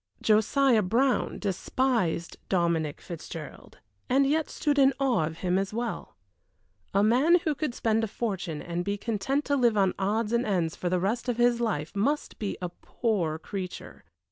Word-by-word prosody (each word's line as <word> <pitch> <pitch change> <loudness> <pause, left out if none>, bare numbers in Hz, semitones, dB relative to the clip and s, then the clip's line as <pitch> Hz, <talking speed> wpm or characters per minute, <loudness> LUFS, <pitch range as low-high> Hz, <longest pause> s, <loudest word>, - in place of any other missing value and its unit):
Josiah 225 +3 +3
Brown 240 +7 +1
despised 200 -3 -1
Dominic 170 -5 0
Fitzgerald, 160 -2 -9 0.3
and 275 +2 +4
yet 305 +2 +1
stood 290 -2 0
in 270 0 +5
awe 250 - +2
of 160 0 -7
him 180 +1 +2
as 195 +2 -3
well. 235 0 -4 0.8
A 200 +1 +3
man 260 +10 +5
who 310 - +1
could 285 -3 -3
spend 225 0 +1
a - - 0
fortune 195 -8 -3
and 175 0 -3
be 200 +2 -2
content 235 +7 -1
to 285 - +1
live 240 -5 +3
on 190 -2 +3
odds 210 +3 0
and 235 +1 +2
ends 175 -7 0
for 180 - -2
the 180 0 +1
rest 225 +7 -1
of 240 - -1
his 240 0 +3
life 185 -8 -2
must 280 +9 -1
be 205 - -3
a 180 - -1
poor 175 -4 -2
creature. 185 +2 -7
215 Hz, 170 wpm, -27 LUFS, 180-250 Hz, 0.8 s, in